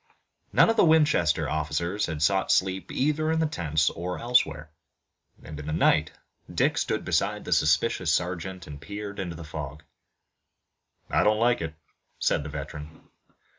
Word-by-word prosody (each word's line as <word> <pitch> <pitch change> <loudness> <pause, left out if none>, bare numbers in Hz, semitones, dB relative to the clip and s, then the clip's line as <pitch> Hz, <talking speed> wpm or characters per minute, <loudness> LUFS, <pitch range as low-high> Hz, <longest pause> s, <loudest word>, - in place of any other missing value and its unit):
None - - +5
of 225 - +1
the - - +6
Winchester 145 - +3
officers 85 +7 -1
had 80 -2 -3
sought 95 +3 +2
sleep 95 0 0
either 150 +3 0
in 160 - +1
the 160 - +2
tents 80 - 0
or 90 +2 -5
elsewhere, 115 -11 +1 0.7
and, 75 -1 -9
in 75 - -8
the - - -2
night, 80 0 +3 0.4
Dick - - +1
stood - - -2
beside - - 0
the - - +1
suspicious 80 +3 +2
sergeant 90 +1 -2
and 70 -1 -10
peered 100 +5 -7
into 90 -3 -4
the 85 - -8
fog. 75 -1 -7 1.3
"I - - +3
don't 105 0 +3
like 120 -1 +2
it," 80 -1 -5 0.4
said - - +1
the 75 - -7
veteran. 75 +1 -8
85 Hz, 160 wpm, -26 LUFS, 75-105 Hz, 1.3 s, the